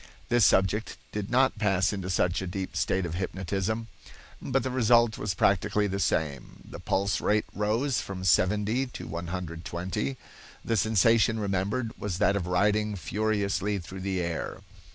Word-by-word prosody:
This 120 -1 +4
subject 95 +3 +2
did 105 -1 -4
not 130 -2 +3
pass 95 -2 +2
into 95 -2 -4
such 90 -1 +1
a 95 - -4
deep 95 +1 -5
state 95 -1 0
of 85 - -4
hypnotism, 95 +5 -2 0.5
but 135 0 0
the 130 - -2
result 120 -2 +3
was 100 -3 -2
practically 100 +2 +2
the 100 -1 -2
same. 75 -7 -2
The - - -9
pulse 100 +1 0
rate 105 0 +2
rose 115 +6 0
from 95 -1 -6
70 105 - +2
to 125 - -8
120. 85 -3 -4 0.5
The 115 - +1
sensation 110 +2 +3
remembered 105 +4 -1
was 100 -4 -3
that 100 0 +3
of 90 -3 -2
riding 105 +3 +1
furiously 100 +2 -1
through 95 +1 -8
the 95 -1 -1
air. 85 -2 -4
100 Hz, 155 wpm, -28 LUFS, 90-110 Hz, 0.5 s, This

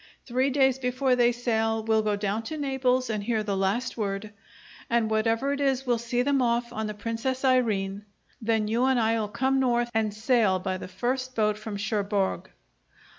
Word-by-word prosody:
Three 260 +2 +1
days 265 -1 +2
before 255 +1 +1
they 240 -1 +4
sail 225 -2 0
we'll 220 0 +2
go 210 -1 0
down 205 +2 -1
to 310 - -5
Naples 260 -3 0
and 215 -2 -2
hear 220 0 0
the 205 -2 -2
last 205 +7 -1
word, 205 -1 -3 0.6
and 230 -2 +1
whatever 225 +5 +1
it 285 - -3
is 270 -1 +1
we'll 240 -2 +1
see 240 +1 -1
them 280 0 +2
off 235 0 0
on 220 -1 -3
the 210 - -5
'Princess 230 +5 -3
Irene.' 210 -6 +1 0.4
Then 220 -1 +1
you 235 +4 +1
and 260 -2 +3
I'll 225 -1 +1
come 265 +6 +1
north 240 -2 +1
and 220 -1 +1
sail 215 -2 +2
by 185 0 -3
the - - -7
first 255 +7 -3
boat 210 -1 +2
from 215 -1 -6
Cherbourg. 200 -1 -1
230 Hz, 185 wpm, -27 LUFS, 210-255 Hz, 0.6 s, they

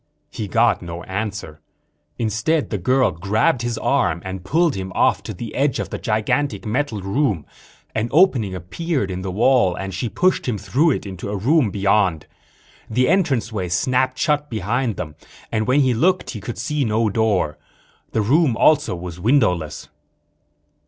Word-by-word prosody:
He 105 - -5
got 115 +4 +2
no 85 0 -7
answer. 100 -6 -5 0.6
Instead 115 +8 0
the 105 - -1
girl 130 +8 +2
grabbed 105 - +1
his 120 -2 -2
arm 125 - +1
and 95 -1 -5
pulled 165 - +2
him 95 -3 -5
off - - +3
to - - -7
the 115 -2 -7
edge 135 -1 +1
of - - -4
the - - -4
gigantic 115 +6 -1
metal 115 -1 -1
room. 100 - 0 0.5
An 110 +2 -1
opening 130 - +3
appeared 100 - -3
in 90 0 -4
the 95 - -4
wall 110 -1 +3
and 95 +1 -5
she 105 +6 -2
pushed 185 +2 +1
him 120 -4 0
through 145 - +1
it 140 - -1
into 95 0 -6
a 105 - -2
room 130 - +3
beyond. 95 -4 +1 0.6
The 125 +3 +2
entranceway 125 - 0
snapped 130 +8 +1
shut 150 0 0
behind 115 +2 -1
them 75 -3 -6 0.3
and 110 -1 0
when 135 +3 +4
he 130 -2 +3
looked 180 +11 +1
he 110 - -7
could 115 +4 -6
see 145 +6 -1
no 110 -1 +1
door. 100 -8 0 0.5
The 110 - +1
room 135 +1 +3
also 150 -9 +3
was 90 0 -7
windowless. 90 - +1
110 Hz, 165 wpm, -21 LUFS, 95-135 Hz, 0.6 s, when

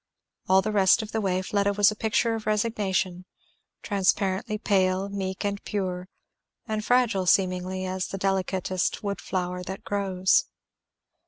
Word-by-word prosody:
All 190 0 +5
the 215 - -1
rest 200 +2 +4
of 215 - -8
the 220 - -1
way 185 -2 0
Fleda 200 +1 +1
was 205 +1 +4
a - - -6
picture 225 +2 +1
of 220 -1 -5
resignation; 200 -4 0 0.6
transparently 200 +2 0
pale, 190 -2 +1
meek 190 -1 -4
and 200 0 -2
pure, 185 -3 -3 0.6
and 215 -1 -2
fragile 230 -6 +2
seemingly, 185 0 +1
as 185 0 -2
the 195 - -5
delicatest 190 -1 -1
wood 200 -1 -3
flower 180 -1 -3
that 190 +2 -7
grows. 190 -2 +2
195 Hz, 145 wpm, -26 LUFS, 185-210 Hz, 0.6 s, All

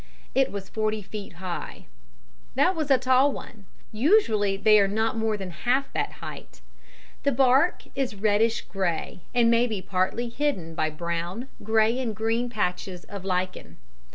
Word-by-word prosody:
It 270 0 +2
was 200 -1 -5
forty 215 -1 -1
feet 200 0 -8
high. 175 0 -6 0.7
That 360 +8 +3
was 310 -3 -2
a 270 - +6
tall 260 +2 +4
one; 215 -6 -9 0.3
usually 215 - +3
they 215 +1 +6
are 200 - +4
not 220 +3 0
more 220 -1 0
than 190 -2 -6
half 245 - 0
that - - -1
height. - - -10 0.6
The 280 - +2
bark 270 +6 +3
is 265 -5 -2
reddish 215 +3 +2
grey, 185 -3 -3 0.2
and 235 -1 +5
may 235 +1 +4
be 215 -4 -3
partly 185 +6 -1
hidden 230 - -2
by 155 -1 0
brown, 170 - -4
grey 220 +3 +2
and 230 -5 -2
green 225 +3 0
patches 180 -4 -2
of 200 -2 -8
lichen. 185 -1 -3
220 Hz, 155 wpm, -26 LUFS, 190-245 Hz, 0.7 s, a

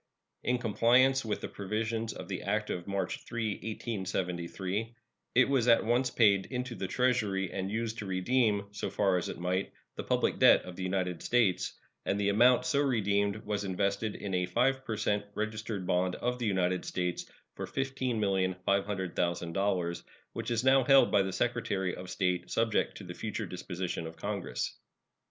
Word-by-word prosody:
In 125 +1 +1
compliance 125 +4 +4
with 110 -2 -2
the - - -3
provisions 110 +3 -2
of - - -8
the 95 -2 -4
act 105 +2 -1
of 90 0 -4
March 100 -2 -2
3, 115 -2 -2
1873, 95 0 -3 0.4
it 125 +1 +6
was 135 -4 +2
at 115 -2 +5
once 125 +3 +2
paid 100 -4 +4
into 125 -1 -4
the 95 - -4
Treasury, 105 -5 +1
and 95 0 -3
used 115 +1 -2
to 100 - -5
redeem, 100 +2 +1
so 105 - -4
far 95 -3 +2
as - - -4
it - - -5
might, 90 +2 -1 0.3
the - - -3
public - - +1
debt - - +7
of 90 - -9
the 95 - -7
United 90 -2 -1
States; 115 -7 +2 0.3
and 100 - 0
the 100 0 +2
amount 120 +4 +5
so 140 +2 +2
redeemed 105 -5 +1
was 105 -1 -1
invested 100 +2 -1
in 100 -2 -5
a 90 0 +1
5 135 +5 +1
per 110 -4 -3
cent 105 -1 0
registered 110 -2 -3
bond 90 0 +1
of 125 +1 -2
the 120 - -1
United 90 -2 +1
States 90 -1 -3 0.2
for - - -5
$15,500,000, 95 -7 -1 0.3
which - - -4
is 120 0 0
now 135 0 +5
held 135 +1 +6
by 100 - +5
the 95 0 -1
Secretary 100 -4 -1
of 90 0 -8
State, 90 -2 -1
subject 115 -1 +1
to - - -9
the 90 -1 -7
future 110 +3 -4
disposition 90 -2 -4
of 80 - -9
Congress. 95 -9 -3
100 Hz, 170 wpm, -31 LUFS, 95-115 Hz, 0.4 s, debt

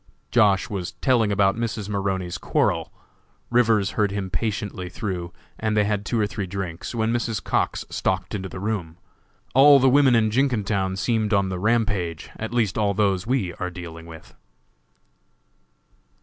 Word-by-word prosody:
Josh. 100 -5 +4
was 95 -5 -4
telling 120 -6 +2
about 100 -1 +3
Mrs. 115 -3 -3
Maroney's 95 -3 -2
quarrel. - - 0 0.6
Rivers 110 -4 +3
heard 105 -2 +1
him 95 -1 -4
patiently 105 -4 -3
through, 90 -3 -4 0.3
and 110 -1 0
they 105 - +4
had 105 -1 -1
two 120 - 0
or 105 - +3
three 100 -1 -4
drinks, 95 +2 -5
when 110 0 0
Mrs. 115 -2 -2
Cox - - -1
stalked 95 +1 -1
into 95 -2 -4
the 90 - -7
room. 95 -6 -3 0.6
All 140 +2 +8
the 135 - +4
women 135 -1 +5
in 110 -2 +3
Jenkintown 105 -7 0
seemed 110 +1 +1
on 100 -1 +1
the 90 -1 -3
rampage, 105 -6 0
at 110 0 -5
least 115 -4 0
all 100 -2 +1
those 100 -2 +1
we 120 -9 0
are 90 - -2
dealing 85 -1 -9
with. 80 -1 -12
105 Hz, 160 wpm, -24 LUFS, 95-115 Hz, 0.6 s, All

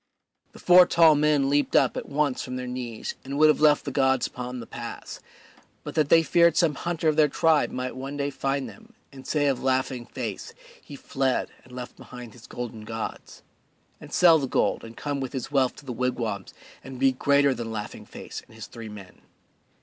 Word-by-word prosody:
The - - -13
four 180 0 +6
tall 165 -2 +6
men 150 -2 +2
leaped 145 +1 +1
up - - +4
at - - -6
once 145 -2 0
from 125 - -6
their 125 0 -4
knees 125 -3 -5
and 140 +1 -5
would 155 +1 +6
have 150 - +2
left 150 -1 +4
the - - -3
gods 130 -2 +2
upon 125 0 -6
the 115 - -7
pass 120 0 -8 0.6
but - - -7
that 150 -3 +1
they 165 0 +6
feared 170 +1 +4
some 165 -4 +3
hunter 170 +2 -2
of 155 - +2
their 155 -1 +6
tribe 155 +1 +2
might 125 0 -4
one 135 +2 -6
day 140 0 -1
find 135 0 -2
them 225 +1 -15 0.2
and 130 -1 -12
say 150 -2 +1
of 135 -3 +1
Laughing 130 -2 -1
Face, - - -6 0.3
"He 145 - -11
fled 135 -1 -1
and 125 - -19
left 125 0 -8
behind 125 -3 -11
his 120 - -15
golden 115 -3 -7
gods," 110 +1 -7 0.6
and - - -12
sell 165 -3 +6
the 135 - -2
gold - - 0
and 115 0 -11
come 145 -1 -3
with 130 -2 -5
his 130 +1 -5
wealth 135 -3 +2
to 150 - -14
the 125 - -5
wigwams 115 -6 -3 0.3
and 130 -1 -9
be 135 0 +4
greater 140 +1 +3
than 115 -2 -5
Laughing 105 -1 -7
Face - - -8
and - - -18
his 110 - -8
three 115 -2 -9
men. 100 -3 -12
135 Hz, 210 wpm, -25 LUFS, 125-150 Hz, 0.6 s, four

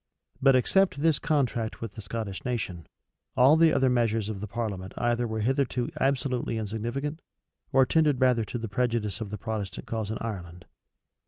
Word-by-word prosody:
But 135 -1 +6
except 155 +3 +2
this 160 -3 +3
contract 125 -8 0
with 115 -3 -6
the 110 - -8
Scottish 100 -1 -5
nation, 100 - -3 0.5
all 130 +4 +7
the 160 0 +5
other 135 - +3
measures 115 -4 +1
of 100 -3 -5
the 105 - -4
parliament 100 -4 -4
either 120 0 +1
were 110 -1 -2
hitherto 125 0 0
absolutely 130 -3 0
insignificant, 120 +9 -3 0.5
or 135 -1 +5
tended 150 -3 +2
rather 125 -3 +3
to 115 - -4
the 115 -1 -4
prejudice 115 -1 -1
of 110 - -4
the 105 - -5
Protestant 105 -2 -4
cause 110 -2 -3
in 110 - -2
Ireland. 90 -6 -6
115 Hz, 170 wpm, -27 LUFS, 105-130 Hz, 0.5 s, all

